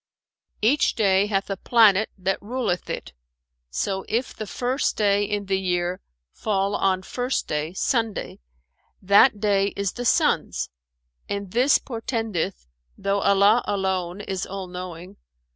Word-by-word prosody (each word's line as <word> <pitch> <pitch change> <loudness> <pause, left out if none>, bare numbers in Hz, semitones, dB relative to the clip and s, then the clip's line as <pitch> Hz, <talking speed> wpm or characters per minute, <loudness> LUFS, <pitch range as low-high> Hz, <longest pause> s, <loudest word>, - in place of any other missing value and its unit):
"Each 270 +7 +3
day 200 -2 +3
hath 195 -2 -1
a - - 0
planet 220 -2 +4
that 190 0 -1
ruleth 225 -5 -2
it: - - -5 0.6
so 190 - -2
if 235 +4 -1
the 215 - -6
first 255 +6 -1
day 205 -1 +3
in 205 0 -2
the 190 0 0
year 180 -1 -1 0.3
fall 200 -2 -1
on 190 -1 +1
First 250 +5 -2
Day 150 +2 -2
(Sunday) 225 +1 -1 0.6
that 205 +4 +5
day 200 -1 +2
is 200 -2 0
the 245 - -6
Sun's 220 - +1 0.6
and 200 -2 -4
this 250 +6 +4
portendeth 225 - -3 0.3
(though 200 0 0
Allah 200 +4 +4
alone 190 -1 -1
is 190 -2 -4
All 195 0 -5
knowing!) 180 +1 -8
200 Hz, 135 wpm, -24 LUFS, 190-220 Hz, 0.6 s, that